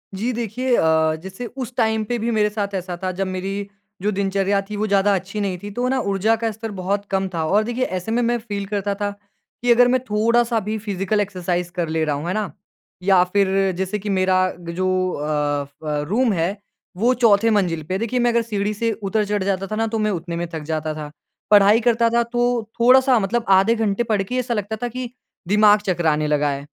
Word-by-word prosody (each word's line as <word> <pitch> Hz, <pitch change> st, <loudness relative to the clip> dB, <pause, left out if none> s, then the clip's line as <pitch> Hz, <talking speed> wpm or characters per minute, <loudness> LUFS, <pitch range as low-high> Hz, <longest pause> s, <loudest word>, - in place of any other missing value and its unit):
जी 230 Hz, +6 st, -1 dB
देखिए 240 Hz, +2 st, -1 dB
अ, 160 Hz, -2 st, +3 dB
जैसे 190 Hz, +6 st, -7 dB
उस 255 Hz, 0 st, -7 dB
टाइम 220 Hz, -2 st, +2 dB
पे 240 Hz, -, 0 dB
भी 235 Hz, +2 st, -1 dB
मेरे 210 Hz, -1 st, +2 dB
साथ 205 Hz, -1 st, -3 dB
ऐसा 180 Hz, -1 st, -4 dB
था 185 Hz, -, 0 dB
जब 195 Hz, -, 0 dB
मेरी 195 Hz, +2 st, -4 dB, 0.3 s
जो 210 Hz, +2 st, +1 dB
दिनचर्या 195 Hz, 0 st, 0 dB
थी 210 Hz, -, -4 dB
वो 215 Hz, +1 st, -1 dB
ज़्यादा 200 Hz, 0 st, +3 dB
अच्छी 190 Hz, +3 st, -4 dB
नहीं 195 Hz, -3 st, -2 dB
थी। 205 Hz, -, -5 dB
तो 245 Hz, +4 st, -1 dB
ना 265 Hz, 0 st, +1 dB
ऊर्जा 200 Hz, +3 st, +2 dB
का 225 Hz, -, +1 dB
स्तर 220 Hz, +1 st, -7 dB
बहुत 200 Hz, +1 st, -2 dB
कम 195 Hz, 0 st, +1 dB
था। 165 Hz, -2 st, -1 dB
और 205 Hz, +7 st, +3 dB
देखिए 240 Hz, +3 st, -2 dB
ऐसे 185 Hz, +3 st, -4 dB
में 240 Hz, +2 st, +1 dB
मैं 240 Hz, 0 st, +1 dB
फ़ील 205 Hz, -3 st, -5 dB
करता 200 Hz, 0 st, -2 dB
था 205 Hz, 0 st, -2 dB, 0.5 s
कि 245 Hz, 0 st, +3 dB
अगर 245 Hz, +1 st, +6 dB
मैं 255 Hz, +1 st, +3 dB
थोड़ा-सा 230 Hz, +2 st, +2 dB
भी 215 Hz, +1 st, -1 dB
फिज़िकल 205 Hz, 0 st, -1 dB
एक्सरसाइज 180 Hz, -3 st, -2 dB
कर 170 Hz, -3 st, -1 dB
ले 160 Hz, 0 st, 0 dB
रहा 150 Hz, -2 st, 0 dB
हूँ, 150 Hz, +4 st, -5 dB
है 180 Hz, -, -1 dB
ना? 215 Hz, -1 st, -2 dB, 0.5 s
या 190 Hz, -1 st, +5 dB
फिर 195 Hz, -1 st, +2 dB
जैसे 190 Hz, +3 st, -2 dB
कि 205 Hz, +1 st, -5 dB
मेरा 185 Hz, -1 st, +2 dB, 0.2 s
ग 170 Hz, -, -9 dB
जो 185 Hz, +1 st, 0 dB, 0.3 s
अ, 145 Hz, -1 st, -1 dB
फ़ 145 Hz, +1 st, -4 dB
रूम 235 Hz, +1 st, +2 dB
है 180 Hz, +3 st, -1 dB, 0.4 s
वो 235 Hz, +6 st, +3 dB
चौथे 225 Hz, -3 st, +4 dB
मंजिल 180 Hz, -7 st, +1 dB
पे 175 Hz, +5 st, -5 dB
है। 190 Hz, -, -1 dB
देखिए 235 Hz, +2 st, -1 dB
मैं 240 Hz, 0 st, +3 dB
अगर 235 Hz, -, +2 dB
सीढ़ी 210 Hz, -2 st, -2 dB
से 230 Hz, +2 st, -1 dB
उतर-चढ़ 205 Hz, -1 st, -1 dB
जाता 195 Hz, 0 st, -1 dB
था 215 Hz, -, -4 dB
ना 225 Hz, +1 st, 0 dB
तो 220 Hz, 0 st, -2 dB
मैं 215 Hz, 0 st, +1 dB
उतने 170 Hz, -2 st, -4 dB
में 170 Hz, +1 st, -3 dB
थक 160 Hz, -, -4 dB
जाता 155 Hz, 0 st, -2 dB
था। 150 Hz, -1 st, -7 dB, 0.4 s
पढ़ाई 205 Hz, +1 st, +7 dB
करता 230 Hz, 0 st, +3 dB
था 235 Hz, 0 st, +2 dB
तो 240 Hz, +1 st, -2 dB, 0.4 s
थोड़ा-सा 255 Hz, +1 st, +5 dB
मतलब 225 Hz, +4 st, -1 dB
आधे 195 Hz, +4 st, +5 dB
घंटे 220 Hz, 0 st, 0 dB
पढ़ 215 Hz, -4 st, 0 dB
के 220 Hz, +6 st, -5 dB
ऐसा 250 Hz, -1 st, -1 dB
लगता 210 Hz, 0 st, -2 dB
था 245 Hz, -, 0 dB
कि 250 Hz, 0 st, -5 dB, 0.4 s
दिमाग 210 Hz, +1 st, +5 dB
चकराने 160 Hz, -5 st, +1 dB
लगा 150 Hz, -1 st, +1 dB
है। 140 Hz, +1 st, -5 dB
205 Hz, 225 wpm, -21 LUFS, 185-225 Hz, 0.5 s, पढ़ाई